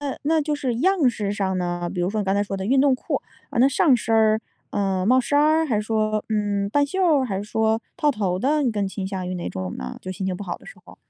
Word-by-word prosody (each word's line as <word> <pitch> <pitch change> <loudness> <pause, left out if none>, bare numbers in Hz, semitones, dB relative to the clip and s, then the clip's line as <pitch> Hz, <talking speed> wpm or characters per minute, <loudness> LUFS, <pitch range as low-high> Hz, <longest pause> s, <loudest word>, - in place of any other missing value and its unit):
那 285 -2 -3
那 315 +2 +2
就 300 0 -1
是 260 -5 -2
样 340 -1 +3
式 205 -4 -2
上 190 -2 -1
呢？ 175 -1 -2
比 180 - -2
如 180 +2 0
说 215 0 -1
你 - - -2
刚 195 0 +1
才 205 - +2
说 195 -1 -4
的 190 +1 -4
运 265 +3 +4
动 275 -2 +4
裤。 - - -3 0.3
呃， - - -3
那 265 - +6
上 275 -1 +4
身 225 0 -1
儿， 220 0 +4 0.3
嗯， 195 -2 0
帽 255 +2 +5
衫 285 +4 +1
儿？ 315 +2 +4
还 215 -6 +1
说， 215 -1 0
嗯， 205 -2 0
半 285 +3 +3
袖 375 +7 -3
儿 300 -7 +4
还 200 -6 -3
是 205 - -4
说 220 +1 +1 0.2
套 300 -4 +2
头 190 -7 -1
的？ 295 +6 +1
你 250 - +2
更 205 -2 -1
倾 190 -1 -5
向 190 -2 -4
于 185 - -3
哪 175 - -4
种 95 -1 -5
呢？ 65 0 -6
就 185 - -6
心 190 0 -4
情 185 -1 -2
不 205 - -7
好 175 -3 -4
的 - - -18
时 - - -11
候。 - - -15
215 Hz, 305 characters per minute, -23 LUFS, 195-275 Hz, 0.3 s, 那